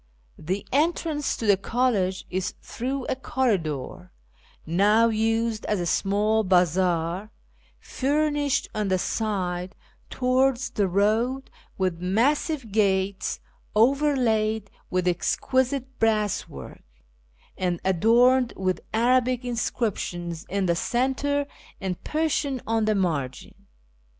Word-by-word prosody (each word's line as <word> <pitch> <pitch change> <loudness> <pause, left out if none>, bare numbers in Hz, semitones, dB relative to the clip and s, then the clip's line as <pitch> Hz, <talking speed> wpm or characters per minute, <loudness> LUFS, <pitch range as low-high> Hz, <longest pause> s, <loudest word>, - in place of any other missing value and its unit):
The 185 +6 -3
entrance 300 0 0
to 230 - -4
the 200 -2 +5
college 200 -4 0
is 185 0 -2
through 260 +2 -4
a - - -1
corridor, 185 - -2 0.5
now 210 +7 +4
used 225 0 0
as 210 - 0
a 175 - -1
small 210 +5 +1
bazaar, 180 +1 +1 0.5
furnished 290 0 0
on 210 -1 -1
the 190 -1 +2
side 185 -3 -2 0.3
towards 255 0 +1
the 200 -2 +1
road 220 +8 +1 0.3
with 185 -3 -1
massive 245 - 0
gates 195 -2 0 0.3
overlaid 225 -4 +2 0.2
with 185 0 0
exquisite 260 +8 0
brasswork, 215 -3 -1 0.7
and 180 -2 -1
adorned 235 +7 +4
with 185 -2 -1
Arabic 250 +1 +2
inscriptions 185 -8 -3
in 195 0 0
the 170 -1 +2
centre 270 - 0 0.3
and 190 -3 -4
Persian 300 -4 -1
on 225 -1 +1
the 215 0 +2
margin. 150 -9 -3
215 Hz, 105 wpm, -25 LUFS, 185-255 Hz, 0.7 s, the